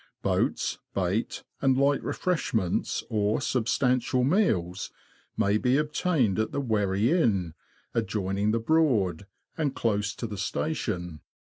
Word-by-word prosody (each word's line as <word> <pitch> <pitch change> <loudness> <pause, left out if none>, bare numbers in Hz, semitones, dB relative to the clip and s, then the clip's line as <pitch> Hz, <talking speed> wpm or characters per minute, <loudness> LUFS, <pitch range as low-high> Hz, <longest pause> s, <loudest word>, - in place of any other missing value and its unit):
Boats, - - 0 0.2
bait, 95 +4 -1 0.2
and 130 -2 +3
light 140 +1 +3
refresh 180 -9 -1
ments, 95 -6 0
or 105 0 +1
substantial 125 0 +1
meals, 110 - +1 0.5
may 105 -1 +2
be 125 +3 +2
obtained 150 - +1
at 110 - 0
the - - -2
Wherry 105 -2 +1
Inn, 100 - +2 0.4
adjoining 105 -2 -1
the 115 +2 +1
Broad, 110 - +1 0.3
and 145 -4 0
close 105 -2 0
to 115 - -5
the 105 -3 -6
station. 90 - -3
110 Hz, 125 wpm, -27 LUFS, 100-135 Hz, 0.5 s, and